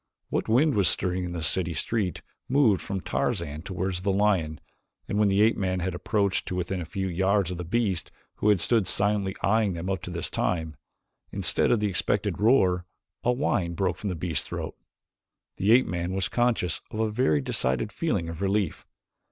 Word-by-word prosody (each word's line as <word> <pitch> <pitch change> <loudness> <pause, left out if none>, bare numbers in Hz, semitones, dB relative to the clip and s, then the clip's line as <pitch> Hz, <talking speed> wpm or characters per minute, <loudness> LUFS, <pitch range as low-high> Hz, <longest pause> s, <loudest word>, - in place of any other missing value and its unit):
What - - -2
wind 140 +7 +4
was 100 -5 +4
stirring 90 -1 +1
in 90 - -5
the 85 -2 -4
city 85 0 +1
street 95 +4 -2 0.3
moved 125 -8 +3
from 95 -1 -4
Tarzan 85 -11 -2
toward 95 +1 -3
the 95 +3 0
lion 95 -7 +1 0.5
and 105 - -1
when 105 - +4
the 100 +1 +3
ape 110 - +3
man 95 -1 -1
had 90 0 -2
approached 100 +2 0
to 90 - -3
within 90 +1 -2
a - - -5
few 95 +4 -3
yards 95 +1 +1
of 90 - -5
the - - -3
beast, 95 -1 -1 0.3
who 105 - +2
had 105 -3 +4
stood 110 +3 +2
silently 100 -1 +1
eyeing 105 -1 +2
them 85 +3 -4
up 95 -2 -2
to 90 - -7
this 85 -1 -2
time, 80 -3 -1 0.6
instead - - +3
of 115 - +2
the 105 - +2
expected 95 -3 0
roar, 95 -7 +3 0.4
a 125 - +3
whine 95 -10 0
broke 90 0 0
from 105 - -4
the 90 - -2
beast's 80 -2 -2
throat. - - -5 0.8
The 100 +3 +2
ape 125 +2 +6
man 90 +1 -3
was 95 -1 -1
conscious 120 -8 0
of 110 - -6
a 110 -1 +1
very 105 - +2
decided 65 -2 -1
feeling 85 - -1
of 85 +1 -7
relief. 100 -3 -1
95 Hz, 195 wpm, -26 LUFS, 85-105 Hz, 0.8 s, ape